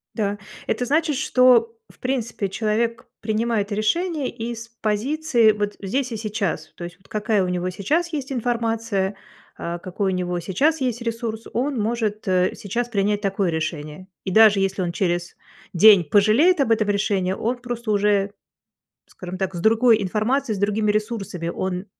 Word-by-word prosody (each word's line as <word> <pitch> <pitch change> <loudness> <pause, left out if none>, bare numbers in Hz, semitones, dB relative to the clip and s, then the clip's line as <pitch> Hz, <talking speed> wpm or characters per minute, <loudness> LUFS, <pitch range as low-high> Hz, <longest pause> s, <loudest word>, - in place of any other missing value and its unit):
Да. 205 -2 -1 0.3
Это 240 +3 -1
значит, 305 +3 +1
что, 245 -3 +4
в - - -20
принципе, 235 -6 -2
человек 225 +3 -1
принимает 220 -1 -1
решение 290 - 0
из 230 0 -6
позиции 235 +2 +2
вот 205 -1 -3
здесь 250 +6 -2
и 225 - -3
сейчас. 210 -4 -3
То - - -8
есть 175 +1 -8
вот 190 - -25
какая 215 -1 0
у - - -1
него 180 0 -1
сейчас 310 - -1
есть 280 -4 -4
информация, 230 -5 -1 0.4
а 170 +1 -4
какой 190 +2 -2
у - - -1
него 180 -1 -2
сейчас 275 - +1
есть 245 -2 -1
ресурс, 230 -1 -4
он 265 +1 -1
может, 215 -1 -2
э, 185 -1 +2
сейчас 235 +5 -3
принять 205 -1 0
такое 195 -2 0
решение. 155 +2 -4 0.2
И 190 - -3
даже 215 0 +6
если 195 0 0
он 175 -1 -1
через 175 -1 -2 0.4
день 200 +1 +7
пожалеет 215 - +4
об 260 - +1
этом 215 -2 +2
решении, 200 -2 0
он 235 +5 -2
просто 240 -2 -4
уже, 205 -1 +2 0.8
скажем 185 0 -8
так, 190 -1 -2
с 175 - -4
другой 225 +2 +4
информацией, 220 +5 0
с - - -6
другими 210 +1 +1
ресурсами, 210 -5 -2
он 185 +2 -3
215 Hz, 165 wpm, -22 LUFS, 190-235 Hz, 0.8 s, день